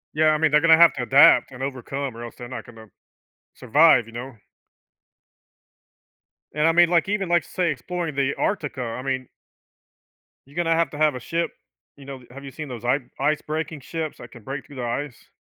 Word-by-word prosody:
Yeah, 155 0 +3
I 155 - +3
mean, 160 -1 +2
they're 150 0 +4
gonna 160 -1 +6
have 170 0 +7
to 125 - -3
adapt 135 +2 +6
and 130 +1 -8
overcome 135 -1 -4
or 120 - -8
else 120 - -9
they're 120 - -9
not 130 - -7
gonna 110 -2 -14 0.7
survive, 130 -1 +4
you 115 - -14
know? 125 +2 -7 2.2
And, 150 +2 +2
I - - +5
mean, 175 0 +5
like, 175 +2 +2
even, 200 -4 -1
like, 175 0 +3
say, 175 -4 -1
exploring 165 +2 -4
the 140 0 0
Arctica. 130 - -2
I - - -5
mean 130 -1 -3 1.2
You're 145 - -19
gonna 165 -2 +1
have 165 0 +1
to 145 - -8
have 150 -3 +2
a - - -5
ship 165 +7 -2 0.4
you 140 -1 -15
know, 135 -2 -9
have 140 +2 -11
you 140 - -8
seen 155 +2 -8
those 120 -3 -8
i 125 +3 +2 0.2
ice 150 +2 +1
breaking 155 0 -4
ships 155 +3 -5
that - - -12
can 120 - -13
break 135 +6 -6
through 140 - -13
the 125 - -4
ice? 125 +3 -5
140 Hz, 205 wpm, -23 LUFS, 130-160 Hz, 2.2 s, have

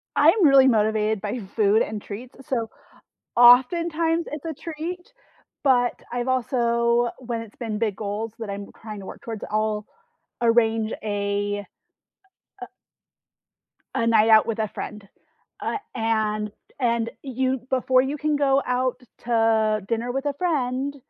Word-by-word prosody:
I'm 400 -7 +5
really 270 -2 +7
motivated 215 -2 +2
by 215 +4 -3 0.2
food 215 0 +4
and 210 -1 -3
treats. 240 +5 -9
So 230 -4 -1 0.7
oftentimes, 325 +7 +5
it's 300 +1 -6
a 320 -2 -4
treat, 340 - -7 0.5
but 245 -3 +3 0.2
I've 245 +1 -2
also 235 -2 +1
when 235 -2 -4
it's 215 - -13
been 220 -4 -4
big 215 -4 -1
goals 210 +1 -4
that 220 -3 -5
I'm 200 0 -5
trying 215 -2 -7
to 190 - -10
work - - -9
towards, 225 -3 -6
I'll 215 0 -1 0.6
arrange 225 -1 +2
a, 205 -1 -1 1.0
uh - - -4
uh - - -17 1.3
a 230 - +1
night 225 -1 +4
out 220 -1 +7
with 225 -1 -2
a 215 -2 0
friend. 210 -1 -7 0.5
Uh, - - -1 0.2
and 215 -2 0 0.3
and 235 -2 0
you 260 0 -1
before 255 0 +3
you 280 +3 -2
can 300 0 0
go 275 -1 +3
out 250 0 0 0.3
to 220 -2 +2
dinner 235 +1 -1
with 270 +1 -3
a 285 - 0
friend, 280 -5 -1
235 Hz, 145 wpm, -24 LUFS, 215-260 Hz, 1.3 s, really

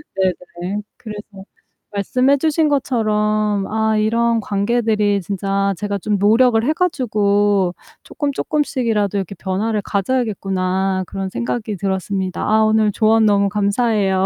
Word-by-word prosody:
네네. 185 +1 -2 0.2
그래서 210 -3 -7 0.7
말씀해 255 +7 +2
주신 315 +1 +1
것처럼 215 -6 0
'아 220 0 0
이런 230 +2 +2
관계들이 210 -1 +1
진짜 195 +1 -1
제가 205 +1 -2
좀 205 +2 -1
노력을 225 +3 +4
해 300 +6 +1
가지고 205 - +1 0.3
쪼끔쪼끔씩이라도 255 - -1
이렇게 195 0 -4
변화를 205 +3 -2
가져야겠구나.' 195 -4 -1
그런 195 +1 -4
생각이 220 -2 -3
들었습니다. 190 0 -2
아 220 0 +4
오늘 215 -1 +3
조언 220 +2 +3
너무 200 -1 +3
감사해요. 200 -2 +1
210 Hz, 305 characters per minute, -19 LUFS, 195-225 Hz, 0.7 s, 노력을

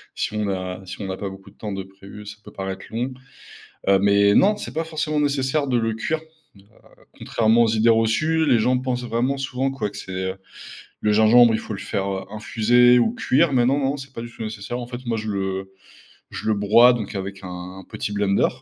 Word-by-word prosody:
si - - -2
on 105 0 -1
n'a 95 -1 -3
si 95 +3 -8
on 100 - -4
n'a 95 0 -4
pas 100 - -4
beaucoup 95 0 -12
de - - -28
temps 105 -2 -5
de 95 0 -4
prévu, 100 +2 -13
ça 105 +1 -9
peut - - -13
paraître 95 0 -5
long, 120 +4 -3 0.8
heu, 100 0 +5
mais 100 +1 +4
non, 205 +2 +5
c'est - - -7
pas, 160 +1 -2
forcément, 155 -1 -2
nécessaire 140 0 0
de 130 -2 +1
le 115 -1 0
cuire, 155 +8 -2 0.8
heu, - - -22
contrairement 115 +1 +2
aux - - +3
idées 110 +1 +3
reçues, 115 +9 +2
les 125 - +4
gens 125 +3 +2
pensent 125 -1 -2
vraiment 120 +4 -1
souvent, 135 0 -2
quoi, 135 -6 -3
que 100 - -11
c'est, 95 - -8 0.2
heu, 95 - -6 0.6
le 105 - +2
gingembre, 110 +2 +6
il 110 - 0
faut 110 - -6
le 100 - -6
faire, 100 -1 -2
heu, 95 -1 -3
infuser 120 +3 +4
ou 125 - +2
cuire, 165 - +2
mais 125 -3 +3
non, 135 +3 +2
non, 140 0 0
c'est 135 -1 -10
pas 115 - -6
du 120 0 -8
tout 115 - -12
nécessaire, 110 +2 -5
en 120 - -6
fait, 125 +1 -8
moi, 115 -1 -1
je 110 0 -4
le 95 -1 -3 0.6
je - - -6
le 110 - +3
broie 115 +5 +6
donc 110 -4 -4
avec 95 0 -5
un 90 +1 -8
petit - - -4
blender, 100 -1 +2
110 Hz, 230 wpm, -22 LUFS, 100-125 Hz, 0.8 s, gingembre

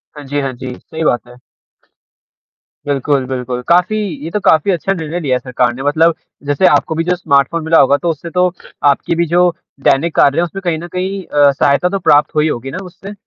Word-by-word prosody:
हाँ 145 - -9
जी, 145 +2 -2
हाँ 135 -1 -2
जी, 125 +1 -7
सही 160 0 -6
बात 120 -6 0
है। 125 0 -15 1.5
बिल्कुल, 140 -1 0
बिल्कुल, 125 -1 -4
काफ़ी 180 +5 +3 0.3
ये 165 - -4
तो 210 - -1
काफ़ी 160 +1 +3
अच्छा 185 +3 -1
निर्णय 165 -1 -4
लिया 140 -6 0
है 125 - -1
सरकार 125 -1 -1
ने 135 +2 -7
मतलब 160 +3 +2 0.3
जैसे 145 +6 +1
आपको 150 +2 +2
भी 165 - 0
जो 180 +1 0
स्मार्टफ़ोन 155 -1 +1
मिला 160 +1 +4
होगा, 140 +2 +4
तो 170 +4 -2
उससे 165 +2 -4
तो 180 +1 +1 0.4
आपकी 150 +4 -2
भी 170 - +1
जो 180 0 +5 0.4
देनिक 155 +4 +1
कार्य 140 +2 +4
हैं 170 - +3
उसमें 195 +3 -5
कहीं 165 -2 0
न 175 - -7
कहीं 190 +1 -3
अ, 145 -1 +3
सहायता 140 +6 +1
तो 195 0 -2
प्राप्त 150 -4 +3
हुई 155 +1 +2
होगी 135 +1 -4
ना 185 - -5
उससे? 195 +3 -10
155 Hz, 215 wpm, -15 LUFS, 140-175 Hz, 1.5 s, जो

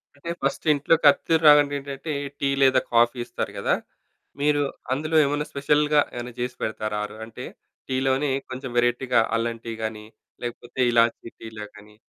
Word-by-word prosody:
అంటే 145 +4 -9
ఫస్ట్ 135 +4 -2
ఇంట్లోకి 150 +3 +1
అథిదులు 160 +3 0
రాగానే 145 -1 +6
ఏంటంటే 140 +3 -6 0.3
టీ 140 - 0
లేదా 130 -1 +5
కాఫీ 120 +1 +4
ఇస్తారు - - -4
కదా! - - +1 0.7
మీరు 145 0 +2 0.3
అందులో 155 +4 -2
ఏమన్నా 145 +1 -1
స్పెషల్‌గా 150 +1 +2
ఏమైనా 120 0 -6
చేసి 125 0 -3
పెడతారా? 110 -1 -3
ఆరు 105 - -10
అంటే 115 - -9 0.4
టీలోనే 130 +2 +1 0.2
కొంచెం 130 +1 -6
వెరైటీగా 120 0 +2 0.2
అల్లం 115 0 -2
టీ 115 - -4
గానీ, 110 -1 -4 0.4
లేకపోతే 120 +1 -7
ఇలాచీ 115 0 +2
టీలా 110 -1 -8
గానీ 105 0 -16
130 Hz, 150 wpm, -24 LUFS, 115-145 Hz, 0.7 s, రాగానే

